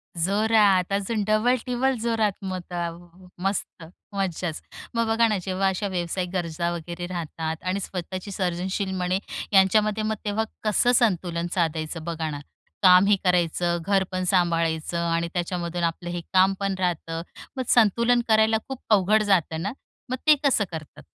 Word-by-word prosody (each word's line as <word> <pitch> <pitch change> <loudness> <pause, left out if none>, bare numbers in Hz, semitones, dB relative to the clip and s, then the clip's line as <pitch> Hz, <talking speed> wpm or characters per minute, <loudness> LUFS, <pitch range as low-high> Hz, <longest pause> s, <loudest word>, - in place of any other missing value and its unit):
जोरात. 200 +1 +3
अजून 205 +2 -1
डबल-टीबल 245 +3 +1
जोरात 225 -3 +1
मग. 185 -1 -3
त - - -7
अ, 170 -1 -1 0.5
मस्त, 195 -3 -2 0.3
मज्जाच. 180 -4 -2 0.3
मग 230 -1 +1
बघा 225 +1 +3
ना, 215 -2 0
जेव्हा 190 0 0
अशा 190 +2 -1
व्यावसायिक 180 0 -2
गरजा 170 -1 -2
वगैरे 170 +1 -6
राहतात, 160 -2 -4
आणि 185 +2 -1
स्वतःची 185 +1 -5
सर्जनशील 190 +1 -2
म्हणे 185 +1 0 0.3
यांच्यामध्ये, 210 +2 +4
मग 220 0 0
तेव्हा 210 +1 0 0.2
कसं 215 +3 +3
संतुलन 175 -7 +1
साधायचं, 160 -2 -1
बघा 165 -1 -3
ना? 145 -1 -5 0.4
कामही 185 +2 +7
करायचं, 175 -1 +1
घर 195 -1 +3
पण 185 0 -2
सांभाळायचं, 170 -2 +1
आणि 170 0 0
त्याच्यामधून 175 -1 -2
आपलं 170 +1 -2
हे 175 0 -3
काम 190 +1 +5
पण 195 -1 -1
राहतं. 165 -2 -2 0.4
मग 260 - -1
संतुलन 235 +2 +4
करायला 220 0 +4
खूप 265 -2 -7
अवघड 215 +1 +4
जातं 170 -5 +1
ना? 195 - -2 0.4
मग 255 - 0
ते 305 - +8
कसं 270 -7 +3
करतात? 160 -3 -9
185 Hz, 150 wpm, -25 LUFS, 170-215 Hz, 0.5 s, ते